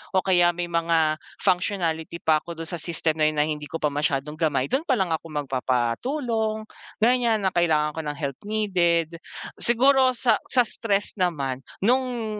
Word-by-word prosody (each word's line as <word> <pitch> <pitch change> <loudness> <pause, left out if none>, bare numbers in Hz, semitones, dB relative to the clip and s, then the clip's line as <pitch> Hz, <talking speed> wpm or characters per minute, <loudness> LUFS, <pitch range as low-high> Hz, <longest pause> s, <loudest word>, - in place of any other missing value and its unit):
o 185 - +3
kaya 175 -2 +4
may 175 -1 -3
mga 165 -2 +1 0.2
functionality 170 -3 0
pa 155 -1 +4
ako 170 0 -7
dun - - -3
sa 175 - -4
system 160 -1 0
na 155 - +4
yun 155 - -5
na 150 - +4
hindi 150 -1 -4
ko - - -8
pa 150 -1 0
masyadong 145 0 -1
gamay, 140 -5 +1
dun 270 +4 +1
pa 260 - +3
lang 185 -3 0
ako 160 +1 -2
magpapatulong, 215 - -1 0.4
ganyan 235 -3 +3
na 190 - +2
kailangan 155 -4 +2
ko 160 - -3
ng 145 - -3
help 140 -3 -4
needed. 170 -6 +1 0.4
Siguro, 260 +2 +4
sa 235 -3 +2
sa 250 -2 +4
stress 205 -3 -2
naman, 140 -8 -1 0.2
nung 240 -2 0
170 Hz, 175 wpm, -24 LUFS, 155-215 Hz, 0.4 s, kaya